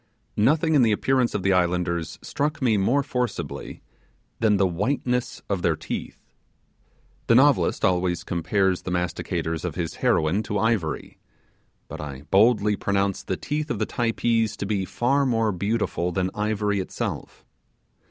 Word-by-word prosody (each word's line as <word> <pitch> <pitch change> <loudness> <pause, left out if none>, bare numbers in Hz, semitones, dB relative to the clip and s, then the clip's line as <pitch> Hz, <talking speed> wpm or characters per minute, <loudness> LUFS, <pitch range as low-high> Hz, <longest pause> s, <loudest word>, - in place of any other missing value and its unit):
Nothing 155 +8 +3
in 145 - +5
the 115 -2 +4
appearance 125 +3 +1
of 100 - -2
the 95 0 +3
islanders 85 -2 0
struck 150 +2 -2
me 120 -5 +2
more 120 +8 +2
forcibly 125 -3 -4 0.6
than 105 -2 +3
the 95 - +3
whiteness 125 +7 -1
of 100 -3 -1
their - - +2
teeth. - - -6 1.1
The 115 - +5
novelist 140 +2 +4
always 90 -2 +1
compares 95 +2 0
the - - -6
masticators 90 -2 -2
of 90 -4 -3
his 85 -2 -4
heroine 80 +7 +2
to 105 -1 -3
ivory; 105 -8 -1 0.7
but - - -7
I 70 -2 -7
boldly 105 0 +4
pronounce 100 -1 0
the - - -3
teeth 150 +1 -3
of 120 - -1
the 110 - 0
Typee 115 -1 +1
to - - -3
be 100 -2 -1
far 135 +8 +1
more 115 -4 +1
beautiful 100 -2 -1
than 95 +1 -1
ivory 105 -1 0
itself. 95 - -5
105 Hz, 150 wpm, -24 LUFS, 90-120 Hz, 1.1 s, in